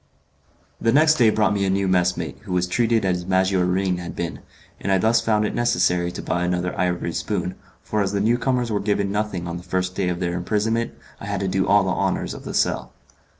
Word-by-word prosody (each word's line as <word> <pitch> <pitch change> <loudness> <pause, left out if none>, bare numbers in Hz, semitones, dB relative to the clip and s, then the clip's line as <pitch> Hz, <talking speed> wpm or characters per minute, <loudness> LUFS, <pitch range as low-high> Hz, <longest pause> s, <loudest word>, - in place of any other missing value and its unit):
The 115 - +3
next 155 +3 +5
day 115 -3 +6
brought 105 -1 +2
me 100 -1 0
a 95 - +1
new 95 0 +1
messmate, 90 -6 0
who 90 - -6
was 90 0 +2
treated 115 +3 +1
as 90 -1 0
Maggiorin 95 0 +1
had 85 -1 -7
been, 85 -1 -4 0.4
and 100 - -2
I 95 - +4
thus 110 +4 +3
found 105 -1 +1
it - - -2
necessary 90 -6 +1
to - - -6
buy 90 - -1
another 90 0 -1
ivory 90 -1 -1
spoon, - - -2 0.3
for 105 - -1
as 100 -1 0
the 100 - -1
newcomers 120 +2 +1
were 105 - +1
given 100 -1 0
nothing 105 -4 -2
on 85 0 -4
the - - -8
first 90 0 -2
day 95 -1 -1
of 90 -1 -2
their 85 -1 -1
imprisonment 110 +6 -1 0.3
I - - -8
had 100 -1 -2
to 95 - -1
do 95 0 0
all 100 0 +5
the 95 - 0
honours - - -1
of - - -10
the - - -5
cell. - - 0
95 Hz, 225 wpm, -23 LUFS, 90-105 Hz, 0.4 s, day